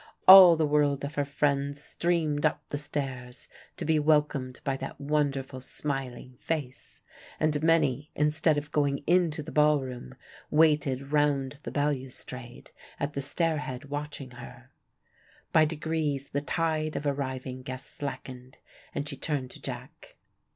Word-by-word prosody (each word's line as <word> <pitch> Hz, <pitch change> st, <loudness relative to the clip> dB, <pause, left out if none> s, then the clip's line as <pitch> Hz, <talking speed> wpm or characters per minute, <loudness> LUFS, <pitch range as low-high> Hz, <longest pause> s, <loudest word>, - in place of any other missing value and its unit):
All 185 Hz, -3 st, +11 dB
the 160 Hz, -1 st, +1 dB
world 145 Hz, -2 st, +2 dB
of 145 Hz, -, -6 dB
her 145 Hz, -1 st, 0 dB
friends 140 Hz, 0 st, 0 dB
streamed 160 Hz, -4 st, 0 dB
up 150 Hz, -1 st, 0 dB
the 145 Hz, -, -2 dB
stairs 130 Hz, -4 st, -5 dB, 0.3 s
to -, -, -4 dB
be 155 Hz, 0 st, +3 dB
welcomed 150 Hz, -4 st, +1 dB
by 135 Hz, -, 0 dB
that -, -, -7 dB
wonderful 140 Hz, -3 st, -1 dB
smiling 130 Hz, -2 st, -5 dB
face, 145 Hz, -6 st, -5 dB, 0.4 s
and 150 Hz, -1 st, +1 dB
many 155 Hz, -3 st, +2 dB
instead 150 Hz, +1 st, +2 dB
of 145 Hz, 0 st, -4 dB
going 140 Hz, -2 st, 0 dB
in 175 Hz, 0 st, +4 dB
to 150 Hz, 0 st, -5 dB
the 155 Hz, -, -8 dB
ball 150 Hz, -1 st, +4 dB
room 130 Hz, -1 st, -8 dB, 0.3 s
waited 145 Hz, -3 st, +2 dB
round 145 Hz, -2 st, +1 dB
the -, -, -6 dB
balustrade 130 Hz, -3 st, -4 dB, 0.3 s
at 145 Hz, +1 st, -2 dB
the 140 Hz, -, -2 dB
stair 160 Hz, +3 st, 0 dB
head 140 Hz, -1 st, -7 dB
watching 145 Hz, -2 st, -5 dB
her. 125 Hz, +1 st, -12 dB, 0.8 s
By 155 Hz, -, +6 dB
degrees 150 Hz, -3 st, -2 dB
the 140 Hz, -, -2 dB
tide 155 Hz, 0 st, -1 dB
of 150 Hz, -, -3 dB
arriving 130 Hz, -2 st, -3 dB
guests 130 Hz, 0 st, -8 dB
slackened, 130 Hz, -2 st, -7 dB, 0.4 s
and 145 Hz, -, -2 dB
she 145 Hz, -, -4 dB
turned 135 Hz, -2 st, -3 dB
to -, -, -12 dB
Jack. -, -, -8 dB
145 Hz, 150 wpm, -28 LUFS, 135-150 Hz, 0.8 s, All